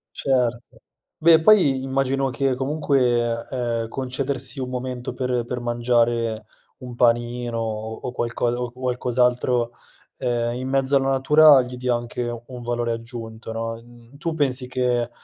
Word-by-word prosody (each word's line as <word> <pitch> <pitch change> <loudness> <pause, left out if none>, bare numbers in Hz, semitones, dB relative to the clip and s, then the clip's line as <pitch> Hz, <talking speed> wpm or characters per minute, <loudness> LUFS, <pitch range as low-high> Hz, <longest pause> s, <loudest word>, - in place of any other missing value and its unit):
Certo. 125 -3 -1 0.4
Beh 165 0 +6
poi 160 -9 +5
immagino 135 0 0
che 135 0 0
comunque, 125 -4 0
ehm, 120 -3 -2
concedersi 130 +2 -2
un 130 -1 -3
momento 125 -1 -4
per 125 -2 -1
per 125 +1 -4
mangiare 120 -2 0 0.3
un 125 -1 -9
panino 120 0 +1
o 110 0 -4
o 125 - -4
qualcosa 120 0 -1
o 125 -1 -3
qualcos'altro, 125 -1 0 0.5
ehm, 120 -1 -1
in 130 +1 -4
mezzo 135 +1 +1
alla 135 0 +2
natura 140 +1 +6
gli 125 0 -6
dia 125 0 0
anche 120 +1 -4 0.2
un 125 -2 -9
valore 120 0 -2
aggiunto, 115 -1 -7
no. 115 0 -3
Mhmm, 120 +2 -17
tu 165 +2 -3
pensi 135 -4 +1
che 125 -2 0
125 Hz, 140 wpm, -23 LUFS, 120-130 Hz, 0.5 s, Beh